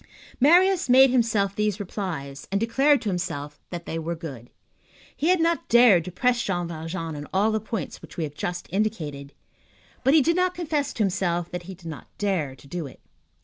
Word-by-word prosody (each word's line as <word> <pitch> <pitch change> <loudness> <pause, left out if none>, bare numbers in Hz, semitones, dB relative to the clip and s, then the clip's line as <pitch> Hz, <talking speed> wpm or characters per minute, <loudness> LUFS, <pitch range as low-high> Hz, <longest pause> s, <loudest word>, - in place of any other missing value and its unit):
Marius 350 +4 +5
made 260 +1 +7
himself 220 -6 +1
these 210 -1 0
replies, 175 -9 -5
and 200 - +1
declared 270 +6 +3
to 215 - -1
himself 160 -6 -4
that 175 -1 -6
they 165 - -3
were 165 +1 -3
good. 135 -8 -8 0.7
He 310 - -1
had 365 -1 +4
not 335 0 0
dared 230 -8 +6
to 180 - -6
press 245 +5 +1
Jean 175 -5 -1
Valjean 165 0 -5
on 145 0 -7
all 205 +4 +2
the 220 - 0
points 220 -1 -5
which - - -13
we 165 - -1
have 145 -2 -5
just 175 +3 -4
indicated, 155 -10 -2 0.7
but 270 +3 +4
he 305 - +6
did 335 +3 +2
not 365 0 +1
confess 300 -5 -1
to 220 - 0
himself 175 -3 -1
that 180 - -4
he 190 - -6
did 170 - -19
not 160 -3 -7
dare 180 -10 -1
to - - -18
do 160 +1 -5
it. - - -14
195 Hz, 200 wpm, -25 LUFS, 165-245 Hz, 0.7 s, made